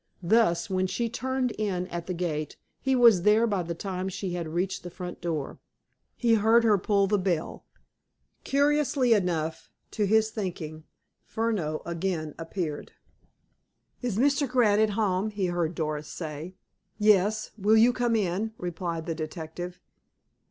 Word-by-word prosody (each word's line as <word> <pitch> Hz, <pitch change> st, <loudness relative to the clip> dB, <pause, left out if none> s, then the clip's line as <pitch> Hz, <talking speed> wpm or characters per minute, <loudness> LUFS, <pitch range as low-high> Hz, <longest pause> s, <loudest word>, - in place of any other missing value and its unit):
Thus, 175 Hz, -3 st, +3 dB
when 185 Hz, -1 st, 0 dB
she 235 Hz, +5 st, -2 dB
turned 260 Hz, +1 st, -1 dB
in 190 Hz, -4 st, -1 dB
at 170 Hz, -1 st, -5 dB
the 185 Hz, -, -2 dB
gate, 155 Hz, -4 st, -3 dB, 0.2 s
he 265 Hz, 0 st, +1 dB
was 235 Hz, -7 st, +6 dB
there 210 Hz, +4 st, +4 dB
by 205 Hz, -5 st, 0 dB
the 170 Hz, 0 st, -4 dB
time 185 Hz, +1 st, -4 dB
she 190 Hz, 0 st, -4 dB
had 170 Hz, -2 st, -3 dB
reached 175 Hz, +4 st, -2 dB
the 175 Hz, -, -7 dB
front 180 Hz, 0 st, -8 dB
door. 160 Hz, -5 st, -3 dB, 0.6 s
He 235 Hz, -2 st, +3 dB
heard 225 Hz, +2 st, +5 dB
her 210 Hz, -3 st, +4 dB
pull 200 Hz, +1 st, +2 dB
the 205 Hz, +1 st, +1 dB
bell. 180 Hz, -4 st, -2 dB, 0.8 s
Curiously 280 Hz, -3 st, +2 dB
enough, 165 Hz, -6 st, -1 dB, 0.2 s
to 210 Hz, -2 st, 0 dB
his 220 Hz, +1 st, +3 dB
thinking, 165 Hz, -7 st, -5 dB, 0.4 s
Furneaux 205 Hz, -9 st, -2 dB
again 170 Hz, -3 st, -2 dB
appeared. 165 Hz, -2 st, -4 dB, 1.1 s
"Is 240 Hz, -6 st, -2 dB
Mr. 280 Hz, +2 st, +2 dB
Grant 220 Hz, -5 st, +3 dB
at 220 Hz, -, +3 dB
home?" 200 Hz, -1 st, 0 dB
he 205 Hz, -2 st, -2 dB
heard 175 Hz, -2 st, -1 dB
Doris 155 Hz, -2 st, -3 dB
say. 160 Hz, +2 st, -6 dB, 0.4 s
"Yes. 210 Hz, 0 st, +3 dB
Will 215 Hz, +1 st, +3 dB
you 235 Hz, +3 st, +6 dB
come 240 Hz, -2 st, +1 dB
in?" 210 Hz, +2 st, -1 dB
replied 170 Hz, -2 st, -4 dB
the 165 Hz, -, -2 dB
detective. 160 Hz, +3 st, -6 dB
190 Hz, 150 wpm, -27 LUFS, 170-220 Hz, 1.1 s, was